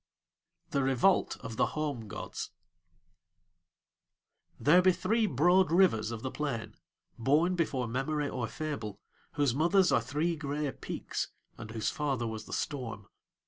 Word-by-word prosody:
THE 140 - +1
REVOLT 135 +8 +3
OF 115 0 -7
THE - - +4
HOME 140 -8 -2
GODS 100 -3 -6 2.1
There 170 +5 +6
be 185 0 +5
three 220 +4 +1
broad 175 +5 +4
rivers 170 - +4
of 115 -1 -6
the 130 - -3
plain, 140 -7 -3 0.5
born 150 +9 +3
before 140 -8 0
memory 145 +5 -1
or 125 -4 -3
fable, 110 -9 -5 0.3
whose 145 -5 +2
mothers 175 +6 +4
are - - +4
three 160 +4 -1
grey 145 -1 -2
peaks - - -4 0.3
and 115 -2 -9
whose 110 -1 -1
father 135 -5 -1
was 110 -1 -5
the - - -12
storm. 115 -8 -4
140 Hz, 140 wpm, -31 LUFS, 115-160 Hz, 2.1 s, There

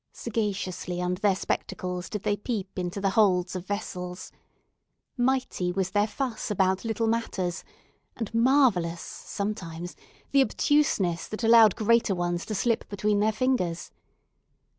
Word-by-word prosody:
Sagaciously 195 -5 -3
under 180 0 -1
their 200 -2 +3
spectacles, 180 -1 -3
did 210 -2 -4
they 205 - +1
peep 205 -3 -4
into 180 +2 -3
the 195 -1 +1
holds 185 -4 +3
of 185 0 -5
vessels. 180 -3 -5 0.8
Mighty 250 -8 0
was 185 0 -1
their 205 +1 +2
fuss 250 -1 -3
about 190 -2 +1
little 225 0 -1
matters, 210 -6 -1 0.5
and 225 -1 -4
marvellous, 230 -9 +3
sometimes, 175 -4 -5 0.4
the 275 - +5
obtuseness 215 - +1
that 215 +2 -6
allowed 225 -3 +7
greater 225 -2 +3
ones 175 0 -2
to 215 - -3
slip 230 +3 0
between 205 0 0
their 215 +1 +3
fingers! 215 -8 -1
205 Hz, 135 wpm, -27 LUFS, 180-225 Hz, 0.8 s, allowed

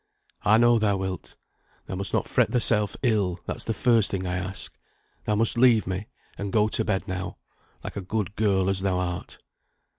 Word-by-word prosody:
"I 110 +1 +4
know 120 0 +4
thou 105 -2 +1
wilt. 95 -1 -5 0.5
Thou - - -7
must 95 +1 -2
not - - 0
fret - - +2
thyself 105 -4 +3
ill, 100 -7 +1
that's - - -3
the 115 - -1
first 115 -4 +3
thing 95 -1 -3
I 90 0 -2
ask. 95 -7 -5 0.5
Thou 105 - +1
must 115 +2 +2
leave 120 -4 +5
me, 95 +3 -4 0.3
and 100 -1 -4
go 105 0 +2
to - - +1
bed 100 -3 -2
now, 95 0 -5 0.5
like - - -7
a 100 - -3
good 105 +2 -3
girl 100 -3 +1
as 95 -1 +1
thou 95 -1 0
art." 90 -1 -4
100 Hz, 190 wpm, -25 LUFS, 95-110 Hz, 0.5 s, leave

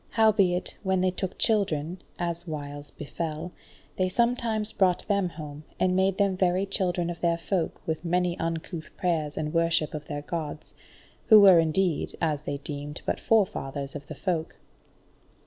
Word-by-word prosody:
Howbeit, 200 -5 +2
when 190 -2 +1
they 185 0 +2
took 185 0 -4
children, 180 -6 0 0.2
as 175 0 -3
whiles 145 -2 -6
befell, 160 +3 -5 0.5
they 185 -1 +2
sometimes 230 -1 0
brought 185 -2 +2
them 200 -3 +1
home, 150 -2 -8 0.2
and 185 0 +2
made 190 0 +2
them 200 -2 +2
very 185 +1 +2
children 180 -3 -1
of 170 - -9
their 170 -1 +2
Folk 170 0 -2
with 160 0 -2
many 180 0 +1
uncouth 165 0 -4
prayers 160 -6 -1
and 155 -1 -2
worship 165 -2 +2
of 150 -1 -6
their 145 -1 -4
Gods, 155 -2 -5 0.5
who 215 -2 +9
were 190 -4 +8
indeed, 165 +1 +1
as 155 -4 0
they 140 - -2
deemed, 145 +1 -6
but - - -1
forefathers 145 -11 0
of 145 -1 -7
the 155 - -7
Folk. 165 -1 -2
170 Hz, 160 wpm, -27 LUFS, 155-190 Hz, 0.5 s, who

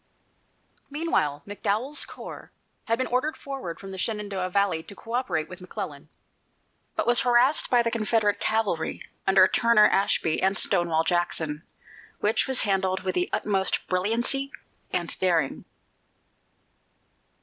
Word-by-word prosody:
Meanwhile, 215 - -1
McDowell's 215 +7 -1
corps - - -10 0.3
had 230 -2 +1
been 260 - 0
ordered 255 +6 -1
forward 270 -12 -6
from 195 -1 -9
the 190 - -7
Shenandoah 200 -3 -2
valley 195 -3 +1
to 200 - -13
coöperate 230 -7 -2
with 180 0 -11
McClellan, 165 -6 -7 0.9
but - - -1
was 240 0 +5
harassed 250 +4 +4
by 245 -1 +4
the 230 - -1
Confederate 215 -2 +1
cavalry 215 -7 -1 0.2
under 190 -1 +6
Turner 235 -1 +4
Ashby 170 -4 +1
and 190 +1 +2
Stonewall 170 -4 +2
Jackson, 165 -3 -1 0.6
which 210 +2 +1
was 265 -1 +3
handled 190 -2 0
with 185 -1 -1
the 180 0 0
utmost 195 -2 +1
brilliancy 235 +9 0 0.4
and - - -2
daring. 170 -7 0
200 Hz, 125 wpm, -26 LUFS, 180-235 Hz, 0.9 s, under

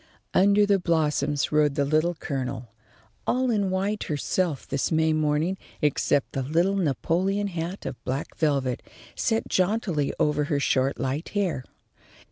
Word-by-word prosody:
Under 200 +2 +5
the 200 -1 +3
blossoms 150 -4 +1
rode 150 -2 +3
the 145 -1 +1
Little 155 +4 +2
Colonel, 130 -6 -4 0.6
all 255 0 +2
in 205 -4 +1
white 195 +3 -1
herself 155 0 -1
this 140 0 -1
May 160 0 +3
morning, 155 +4 0 0.2
except 145 -1 +1
the 135 - -2
little 170 +8 +1
Napoleon 185 +4 0
hat 175 0 -4
of - - -6
black 135 +3 -3
velvet, 140 -5 0 0.3
set 225 -2 0
jauntily 185 -6 +1
over 150 0 +2
her 145 -2 0
short 135 -1 +1
light 135 +5 -2
hair. 180 -10 0
160 Hz, 140 wpm, -26 LUFS, 145-190 Hz, 0.6 s, Under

